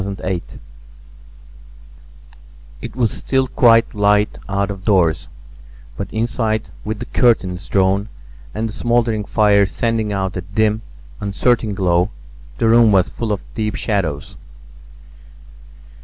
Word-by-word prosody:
THE 100 0 -4 0.3
KISS - - -15 2.2
It - - -8
was 120 -4 +1
still 130 -1 0
quite 115 -2 +4
light 105 0 +2
out 100 +1 0
of 95 -1 -8
doors, 90 -7 +2 0.7
but 100 - -4
inside 110 -1 -1
with 110 0 -3
the 120 - -6
curtains 95 -8 +1
drawn 100 +1 +1 0.4
and 110 +1 -3
the 110 - -7
smouldering 115 -2 0
fire 100 -2 +3
sending 110 +1 -1
out 95 -2 -2
a 90 - -3
dim, 105 +4 0 0.4
uncertain 105 +1 0
glow, 90 -1 +2 0.5
the - - +1
room 115 -1 +6
was 95 -2 +3
full 115 -2 -4
of 100 - -3
deep 105 -1 -2
shadows. 85 -10 -2
105 Hz, 125 wpm, -19 LUFS, 95-115 Hz, 2.2 s, room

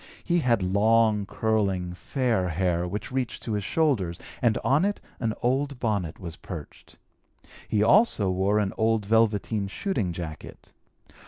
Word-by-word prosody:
He 175 0 +2
had 120 - +2
long, 105 +2 +3
curling, 100 -6 0
fair 115 -2 -1
hair 90 0 0
which 100 +5 -5
reached 130 -3 -3
to 115 - -3
his 105 -1 -1
shoulders 105 - 0 0.2
and 115 -3 +3
on 140 +6 +3
it 205 +1 0 0.2
an 115 -3 -1
old 135 +2 0
bonnet 100 -9 -2
was 85 -3 -7
perched. 80 -6 -10 0.7
He 105 -1 +2
also 115 - +4
wore 95 +3 +1
an 100 -2 0
old 110 -1 +2
velveteen 110 -1 +1
shooting 105 - -2
jacket. 85 -3 -8
105 Hz, 145 wpm, -26 LUFS, 95-120 Hz, 0.7 s, also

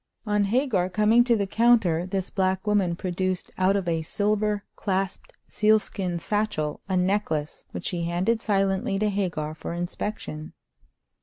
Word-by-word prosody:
On 210 -1 +2
Hagar 210 -5 +1
coming 215 +5 +4
to 240 -2 +4
the 200 -2 0
counter 195 -6 +3
this 190 0 -3
black 190 0 0
woman 200 -5 +2
produced 185 +1 -2
out 185 +1 +2
of 195 -3 -1
a 165 -1 +1
silver 210 +4 0
clasped 195 -1 -2
sealskin 210 -4 +1
satchel 205 -5 -1
a 190 - +1
necklace, 180 -5 -1
which - - -7
she 170 -2 -2
handed 185 +7 0
silently 195 -2 +1
to 210 +1 +1
Hagar 175 -6 -2
for 155 - -6
inspection. 175 -2 -5
195 Hz, 145 wpm, -25 LUFS, 175-210 Hz, -, coming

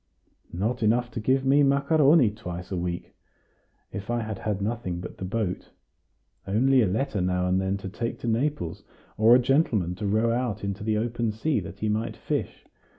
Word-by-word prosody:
"Not 115 +7 -1
enough 120 +3 +2
to 120 - -4
give 130 +4 +1
me 140 +2 +5
macaroni 140 -1 +4
twice 90 -3 -7
a - - -1
week, 85 -1 -4 0.8
if 100 +1 -7
I 120 0 0
had 110 -2 -5
had 105 -2 -2
nothing 100 -4 -3
but 90 - -8
the 95 - -4
boat 100 -1 -3 0.8
only 130 +6 +4
a 110 - +3
letter 105 +1 -1
now 90 0 0
and 90 +1 +2
then 95 +1 -1
to 100 - -7
take 115 +4 -4
to - - -4
Naples, 120 - -1 0.3
or 110 +3 +6
a - - +6
gentleman 125 - +2
to 100 +3 -4
row 110 +3 +2
out 120 -4 -2
into 100 +1 -3
the 110 0 +1
open 115 0 -1
sea, 115 +6 0
that 95 +1 -9
he 110 - 0
might 110 +1 -1
fish. - - -3
110 Hz, 190 wpm, -26 LUFS, 95-125 Hz, 0.8 s, or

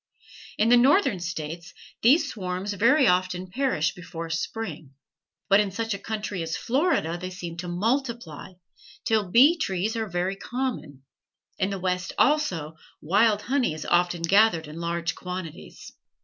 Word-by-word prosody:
In 220 +2 +3
the 245 - +7
Northern 265 - +4
States 170 0 -6 0.3
these 270 +9 +5
swarms 185 0 -4
very 260 +8 +4
often 180 -1 0
perish 255 - 0
before 165 -2 -7
spring; 160 -5 -5 0.5
but 195 0 +5
in 205 -1 +1
such 225 +3 -3
a 200 - -5
country 210 -3 -4
as 165 0 -3
Florida 255 - 0
they 185 +1 -5
seem 175 -2 -7
to 180 +1 -5
multiply, 220 - -2 0.5
till 215 -4 +1
bee 280 - +6
trees 195 - -1
are 225 -1 -2
very 180 +2 -1
common. 195 - -5 0.6
In 190 - +1
the 200 - -3
West, 180 -1 -2
also, 180 - +1 0.3
wild 205 +5 +2
honey 255 - 0
is 155 - -7
often 175 -1 +1
gathered 190 -3 +3
in 150 +2 -9
large 170 0 -2
quantities. 180 -3 -8
185 Hz, 150 wpm, -25 LUFS, 170-225 Hz, 0.6 s, the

